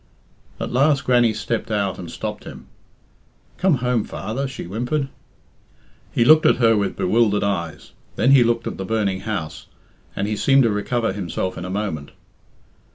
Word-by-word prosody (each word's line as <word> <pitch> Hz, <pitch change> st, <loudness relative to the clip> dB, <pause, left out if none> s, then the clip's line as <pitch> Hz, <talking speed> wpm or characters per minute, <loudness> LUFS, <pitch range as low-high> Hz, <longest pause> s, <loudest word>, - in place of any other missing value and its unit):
At -, -, -4 dB
last 140 Hz, +3 st, +2 dB
Grannie 120 Hz, -2 st, +4 dB
stepped 115 Hz, +1 st, -3 dB
out 100 Hz, -3 st, -1 dB
and 85 Hz, -, -7 dB
stopped -, -, -6 dB
him. -, -, -10 dB, 0.9 s
"Come 185 Hz, -4 st, +3 dB
home, 125 Hz, -3 st, +1 dB
father," 135 Hz, +6 st, -4 dB
she 130 Hz, -, -7 dB
whimpered. 125 Hz, -, -2 dB, 1.0 s
He 115 Hz, -, +2 dB
looked 155 Hz, +2 st, +6 dB
at -, -, +5 dB
her 115 Hz, -2 st, +4 dB
with 100 Hz, -2 st, -1 dB
bewildered 105 Hz, +1 st, +2 dB
eyes, 85 Hz, -5 st, -3 dB, 0.2 s
then 130 Hz, -, +3 dB
he 135 Hz, -3 st, +7 dB
looked 115 Hz, 0 st, 0 dB
at -, -, -4 dB
the -, -, -2 dB
burning 100 Hz, -3 st, -1 dB
house, 100 Hz, -9 st, -5 dB, 0.5 s
and 100 Hz, -, -2 dB
he 105 Hz, -, -1 dB
seemed 135 Hz, +5 st, +4 dB
to 115 Hz, -, +2 dB
recover 115 Hz, +1 st, -1 dB
himself 95 Hz, -1 st, -3 dB
in 90 Hz, -, -6 dB
a -, -, -5 dB
moment. 95 Hz, -7 st, -3 dB
110 Hz, 165 wpm, -21 LUFS, 100-125 Hz, 1.0 s, he